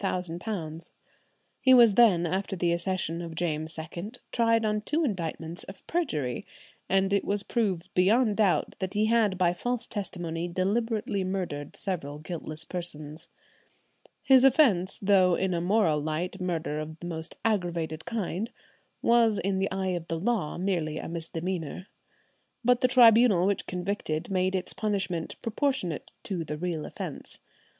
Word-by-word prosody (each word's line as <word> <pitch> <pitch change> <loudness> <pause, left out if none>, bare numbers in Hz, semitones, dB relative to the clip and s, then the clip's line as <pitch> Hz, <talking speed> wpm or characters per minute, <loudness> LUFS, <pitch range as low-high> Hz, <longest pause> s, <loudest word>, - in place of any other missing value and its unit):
He 260 -1 +7
was 235 -4 +7
then, 195 -6 +5
after 190 +3 -2
the 175 -1 +1
accession 170 -1 -1
of 165 -1 -7
James 160 -1 -2
II, 170 +7 -6 0.2
tried 230 -1 +3
on 210 0 0
two 305 +9 0
indictments 170 - -3
of 195 - -12
perjury, 150 - -1 0.5
and 195 +1 +2
it 200 - +2
was 205 0 0
proved 195 -7 -1
beyond 210 +4 +3
doubt 205 -5 +1
that 190 +1 -3
he 210 +1 +3
had 220 -4 +2
by 175 -1 +3
false 245 +6 -2
testimony 175 -4 -3
deliberately 205 +2 0
murdered 180 -7 -3
several 160 -7 -4
guiltless 155 0 -7
persons. 155 -4 -6 0.9
"His 265 -2 +6
offence, 240 - +4
though 190 -3 +4
in 190 0 0
a 170 - 0
moral 175 -4 +2
light 160 +5 -3
murder 165 -4 -2
of 155 +1 -6
the - - -8
most 165 -1 -5
aggravated 170 -7 -1
kind, 220 -1 -2 0.5
was 230 -3 +4
in 195 0 0
the 195 - 0
eye 190 0 -2
of 175 -2 -3
the 165 - -2
law 200 -5 -1
merely 170 -5 -1
a - - -5
misdemeanour." 170 +1 -4 0.8
But 250 0 +4
the 255 - +5
tribunal 230 -6 +6
which 200 -1 0
convicted 180 -3 -3
made 185 0 +1
its 185 -1 -2
punishment 195 -6 -2
proportionate 230 - -1
to 180 -4 -3
the 150 -1 -5
real 165 -2 -3
offence. - - -6
185 Hz, 145 wpm, -28 LUFS, 165-210 Hz, 0.9 s, He